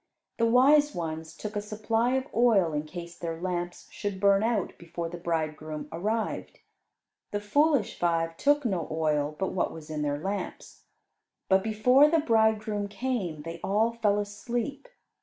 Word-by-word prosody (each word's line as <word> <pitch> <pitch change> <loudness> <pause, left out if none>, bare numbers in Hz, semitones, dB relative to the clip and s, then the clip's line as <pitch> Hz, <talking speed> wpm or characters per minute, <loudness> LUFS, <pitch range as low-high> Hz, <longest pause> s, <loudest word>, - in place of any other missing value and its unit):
The 230 - +4
wise 290 +5 +5
ones 160 -1 -5
took 210 0 -6
a 205 - 0
supply 225 +4 0
of 265 0 0
oil 215 -9 +4
in 150 +1 -2
case 170 +1 -8
their 165 -1 -5
lamps 175 -1 -4
should 205 -3 -4
burn 200 0 +4
out 220 -4 0
before 170 0 -5
the 175 +1 -7
bridegroom 155 -2 -3
arrived; 215 +7 -2 0.7
the 205 - -2
foolish 280 +3 +2
five 165 -1 +1
took 290 +6 +2
no 185 -8 -1
oil 155 -2 0
but 190 - -2
what 185 - 0
was 155 -1 -10
in 150 -1 -3
their 145 -1 0
lamps. 195 +4 -5 0.6
But 190 0 +5
before 250 +7 +5
the 330 - +3
bridegroom 220 -6 +2
came 200 -9 -3
they 165 +1 -6
all 215 +4 +2
fell 210 -3 +1
asleep. 235 - -3
200 Hz, 160 wpm, -28 LUFS, 165-230 Hz, 0.7 s, wise